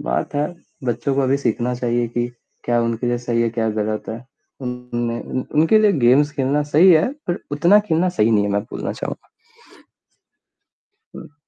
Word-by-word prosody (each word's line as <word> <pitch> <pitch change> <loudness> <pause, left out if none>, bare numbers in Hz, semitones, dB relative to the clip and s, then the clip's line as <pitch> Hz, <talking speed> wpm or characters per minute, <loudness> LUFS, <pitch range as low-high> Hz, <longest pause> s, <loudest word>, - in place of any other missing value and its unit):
बात - - -2
है, 145 +1 +1 0.4
बच्चों 125 +3 -1
को 140 - +1
अभी 135 +1 +2
सीखना 125 -1 -1
चाहिए 120 -1 -1
कि 120 +1 -1 0.4
क्या 120 -1 +1
उनके 115 +1 -2
लिए 120 0 0
सही 120 -1 -1
है, 115 - +1
क्या 115 -1 -1
गलत 105 0 -2
है। 115 +3 -6 0.4
उन्हें 120 -1 -4
उन 130 - -3
उनके 165 +8 +5
लिए 210 -2 +4
गेम्स 135 +2 +4
खेलना 140 +2 0
सही 160 +5 +5
है, 155 +8 +4 0.2
पर 175 - -1
उतना 175 +8 +5
खेलना 170 +2 +2
सही 115 -11 +1
नहीं 105 -2 +3
है 100 - -1
मैं 100 0 0
बोलना - - -4
चाहूँगा। - - -7 1.9
हुँ। 145 - -11
125 Hz, 180 wpm, -20 LUFS, 115-145 Hz, 1.9 s, उनके